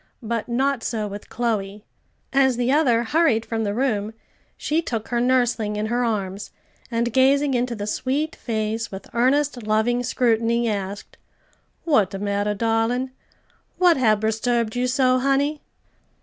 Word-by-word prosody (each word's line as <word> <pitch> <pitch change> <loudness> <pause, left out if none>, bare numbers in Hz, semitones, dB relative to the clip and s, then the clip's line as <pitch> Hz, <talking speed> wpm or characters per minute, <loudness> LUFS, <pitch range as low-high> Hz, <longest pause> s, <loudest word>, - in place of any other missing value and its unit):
But 230 +1 -3
not 265 +1 0
so 220 -2 -2
with 205 0 -8
Chloe. 210 -3 -2 0.5
As 265 -3 +3
the 245 +1 +1
other 255 -6 +3
hurried 240 -4 +2
from 225 -1 -2
the 205 -1 -1
room, 220 -4 -1 0.4
she 310 +2 0
took 230 -9 -4
her 240 -1 0
nursling 245 -4 +1
in 210 +1 -2
her 240 +3 0
arms, 200 -3 -2 0.4
and 235 -1 -1
gazing 275 +2 +3
into 245 -1 0
the 205 -1 -4
sweet 275 +8 -2
face 220 0 -3
with 195 0 -8
earnest, 260 +2 +1
loving 220 +3 +1
scrutiny; 235 -1 +1
asked, 200 -1 -4 0.7
"What 270 - +3
de 195 - -6
matter, 205 +1 -1
darlin'? 230 +4 0 0.7
what 355 -2 +5
hab 215 -5 +3
resturbed 225 +1 0
you 250 +1 0
so, 255 0 +2
honey?" 275 +3 +1
235 Hz, 150 wpm, -23 LUFS, 215-260 Hz, 0.7 s, what